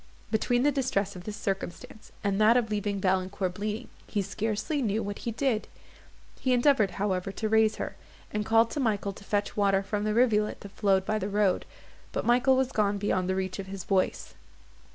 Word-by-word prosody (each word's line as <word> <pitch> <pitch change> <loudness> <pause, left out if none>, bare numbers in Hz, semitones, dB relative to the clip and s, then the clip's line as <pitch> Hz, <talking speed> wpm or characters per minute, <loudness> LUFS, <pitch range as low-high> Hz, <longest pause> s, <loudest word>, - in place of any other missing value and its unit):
Between 245 +3 +2
the 290 - +4
distress 225 -8 -1
of 180 - -9
this 210 -1 -5
circumstance 195 +1 -5
and 200 0 +1
that 225 +3 +6
of 225 -3 0
leaving 205 -1 -1
Valancourt 185 0 0
bleeding, 210 +4 -4 0.2
he 205 -2 -1
scarcely 220 - -2
knew 220 -2 0
what 200 0 -5
he 235 - -3
did; 245 -2 0 0.7
he 255 - +1
endeavoured, 245 -4 +4
however, 195 -1 -1
to 220 - -2
raise 220 0 +4
her, - - -5 0.4
and 210 0 0
called 225 +1 +3
to - - -3
Michael 205 -5 0
to 200 - -13
fetch 205 0 -1
water 195 -1 +2
from 205 +1 -2
the 215 0 0
rivulet 220 -3 +2
that 200 - -9
flowed 195 -2 +2
by 215 +1 0
the 200 - -3
road, 205 -2 +1 0.5
but - - -2
Michael 250 +2 +4
was 265 0 +1
gone 205 -4 +1
beyond 190 -2 0
the 190 - +1
reach 190 0 -3
of 195 - -5
his 190 -1 -6
voice. 190 -1 0
210 Hz, 195 wpm, -28 LUFS, 195-225 Hz, 0.7 s, that